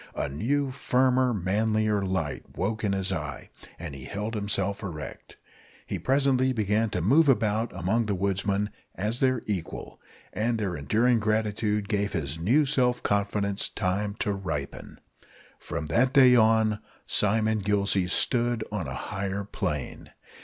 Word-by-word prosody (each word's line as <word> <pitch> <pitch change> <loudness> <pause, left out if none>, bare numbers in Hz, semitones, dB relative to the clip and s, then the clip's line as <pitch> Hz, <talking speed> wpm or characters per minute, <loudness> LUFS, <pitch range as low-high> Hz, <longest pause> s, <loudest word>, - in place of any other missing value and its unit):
A - - -1
new, 130 - -1
firmer, 130 -1 +2
manlier 105 +1 +1
light 95 -6 -3
woke 110 0 -2
in 100 - +1
his 95 -1 0
eye, - - -6 0.3
and 85 -4 -7
he 65 -2 -9
held 105 - -4
himself 100 -1 -1
erect. 80 -8 -8 0.5
He - - -4
presently 130 -1 +2
began 110 0 +1
to - - -2
move 145 - +5
about 110 -2 +2
among 95 +7 0
the 100 - 0
woodsmen 100 +2 -1 0.2
as 110 +5 -2
their 130 -3 +1
equal, 95 -6 -5 0.3
and 115 +2 0
their 100 -5 -2
enduring 115 - +2
gratitude 105 -1 0
gave 100 -1 -1
his 80 -1 -3
new 125 - +3
self 125 -3 +1
confidence 100 0 0
time 100 +1 -2
to 105 - -1
ripen. 80 -8 -5 0.6
From - - -5
that 120 - +2
day 130 -3 +7 0.7
Simon 110 +1 +2
Gillsey 100 -2 +1
stood 120 +3 +1
on 100 -8 -3
a 65 - -5
higher 100 0 -3
plane. 90 -9 -4
105 Hz, 140 wpm, -27 LUFS, 95-115 Hz, 0.7 s, day